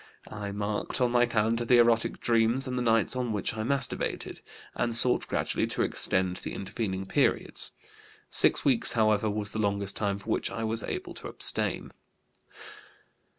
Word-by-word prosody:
I 100 -1 -5
marked 105 +1 -3
on 125 -2 +2
my 120 0 +3
calendar 115 +1 0
the 120 +1 +4
erotic 115 -1 +2
dreams 115 +3 +2
and 125 - -3
the 125 - -1
nights 115 0 +1
on 125 -2 -2
which 105 - -1
I 110 - -4
masturbated, 135 +4 0 0.3
and 120 -1 -2
sought 125 +1 +1
gradually - - -1
to - - -1
extend 95 -1 -1
the - - -6
intervening 95 -1 -4
periods. - - +1 0.5
Six - - +3
weeks, 130 -5 +3
however, 110 -1 +2
was 105 0 -2
the 110 - -4
longest 100 -1 0
time 100 -2 -1
for 100 - -6
which - - -1
I 115 - -5
was 110 0 +2
able - - -5
to - - -8
abstain." - - 0
110 Hz, 165 wpm, -28 LUFS, 100-120 Hz, 0.5 s, the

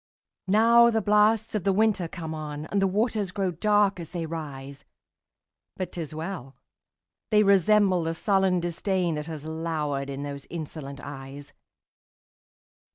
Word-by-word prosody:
Now 230 +4 +6
the 225 -1 +1
blasts 210 +1 +3
of 210 -4 -1
the 195 - +2
winter 200 -3 +2
come 165 -2 -6
on, 150 -1 -6
And 200 - +1
the 195 - +3
waters 210 0 0
grow 190 -1 -1
dark 205 +2 +2
as 165 -2 -7
they 170 -3 -4
rise! 140 -4 -7 0.9
But 185 - -4
't 175 - -5
is 155 -1 -7
well!—they 170 - -4
resemble 200 -1 +4
the 165 0 -2
sullen 190 -1 +2
disdainThat 175 -2 -1
has 155 -2 -7
lowered 155 -4 -3
in 140 +1 -5
those 140 -1 -7
insolent 150 -4 -7
eyes. 140 0 -9
175 Hz, 140 wpm, -26 LUFS, 150-200 Hz, 0.9 s, Now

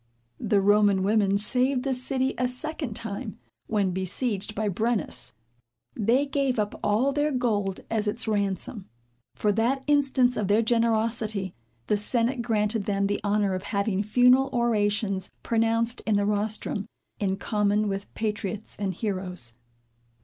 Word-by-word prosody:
The 205 -3 +2
Roman 205 -1 +4
women 200 -1 +2
saved 250 +5 +3
the 275 -1 0
city 260 +1 0
a 250 - 0
second 265 -1 -4
time, 220 0 -5 0.3
when 200 -4 +1
besieged 195 +3 -1
by 215 +1 -1
Brennus. 205 - 0 0.6
They 235 +6 +2
gave 275 -3 0
up 210 -1 -1
all 220 +7 +2
their 295 +1 +1
gold 210 -7 -1
as 220 -2 0
its 225 +3 -1
ransom. 200 0 -2 0.5
For 210 - +1
that 240 +6 0
instance 270 -4 +2
of 205 - -1
their 210 +3 +3
generosity, 225 -4 0 0.3
the 210 - +1
senate 235 +4 0
granted 215 -2 0
them 200 -1 0
the 205 +1 -1
honor 205 -1 +1
of 185 - -2
having 200 -1 0
funeral 250 +5 +4
orations 205 -5 0
pronounced 230 +1 +1
in 215 - +3
the 205 0 +2
rostrum, 210 0 -2 0.3
in 195 -2 0
common 210 0 +1
with 195 0 -4
patriots 215 -1 -3
and 195 -3 -2
heroes. 185 - -4
215 Hz, 140 wpm, -26 LUFS, 200-240 Hz, 0.6 s, Roman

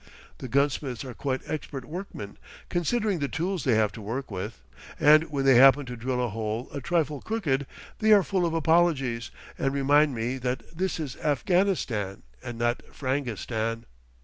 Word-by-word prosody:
The 130 - -6
gunsmiths 135 0 0
are 125 - -6
quite 130 +2 -2
expert 140 -4 -5
workmen, 150 - -7 0.3
considering 195 +2 0
the 140 - 0
tools 175 +5 -2
they 125 -4 +4
have 110 -1 +2
to 110 - -9
work 115 +5 -4
with, 95 - -6 0.4
and 155 +2 +6
when 140 -2 -1
they 135 - +7
happen 135 +2 +7
to 125 -1 -6
drill 125 +1 -1
a - - -2
hole 110 +2 -3
a 140 - -4
trifle 155 -2 0
crooked, 145 -12 -1 0.3
they 220 0 +3
are 205 -2 +7
full 190 -1 0
of 165 - -2
apologies, 150 - +2 0.3
and 135 - +1
remind 145 0 +4
me 120 +3 -2
that 125 +1 -2
this 185 0 -1
is 145 -5 -5
Afghanistan 145 - 0 0.2
and 120 -1 -6
not 120 +1 0
Frangistan. 115 -4 -2
135 Hz, 170 wpm, -27 LUFS, 120-160 Hz, 0.4 s, they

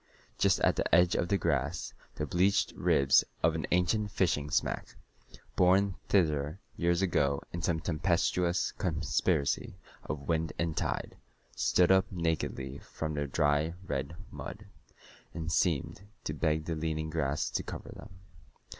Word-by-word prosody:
Just - - +4
at - - +3
the - - +2
edge 90 +1 +5
of 85 - 0
the 100 - +2
grass - - -1 0.2
the 75 - -2
bleached 90 +5 +2
ribs 70 0 +4 0.2
of 80 0 +4
an 80 - -3
ancient 105 +4 +2
fishing 75 -7 0
smack, - - -1 0.6
borne 95 +2 +4 0.2
thither 75 -4 +2 0.2
years 85 +2 +1
ago 70 -6 +2
in 85 - -3
some 85 -2 0
tempestuous 85 +2 +1
conspiracy 75 -4 0 0.3
of 70 -2 -5
wind 80 -2 0
and 85 -2 -1
tide, - - -2 0.4
stood 90 0 +3
up 95 0 +4
nakedly 80 -6 -2
from 80 -1 -5
the 75 -1 -2
dry 75 +3 +1
red 70 0 -3 0.2
mud, 105 0 -8 0.7
and 80 -1 -3
seemed 80 +1 0 0.2
to 75 - -3
beg 80 0 0
the 85 - -2
leaning 80 0 -2
grass 75 -2 -1
to - - -1
cover - - -7
them. - - -10
80 Hz, 145 wpm, -31 LUFS, 75-90 Hz, 0.7 s, edge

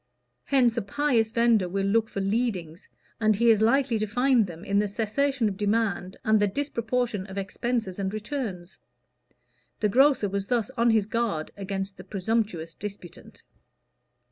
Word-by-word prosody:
Hence 250 -4 +3
a - - +2
pious 230 +1 +1
vendor 230 -5 +3
will 195 +2 -1
look 220 +2 +2
for 195 - -4
"leadings," 195 -6 -2 0.3
and 215 -1 +3
he 235 +3 +4
is 215 -1 +3
likely 245 0 +3
to 215 - -1
find 245 0 +2
them 170 +1 -10
in 200 0 +2
the 210 - +1
cessation 230 +4 0
of 195 -2 -3
demand 205 -3 -1
and 215 -1 +4
the 205 - +3
disproportion 235 -4 -2
of 190 0 -9
expenses 205 0 -2
and 190 -1 -1
returns. 210 - -5 1.0
The 210 - +1
grocer 265 -1 +4
was 200 0 -3
thus 240 -1 0
on 235 -2 +2
his 220 -3 +3
guard 215 -8 -2
against 195 0 -4
the 185 - -10
presumptuous 195 -4 -2
disputant. 200 -4 -10
215 Hz, 160 wpm, -26 LUFS, 195-235 Hz, 1.0 s, he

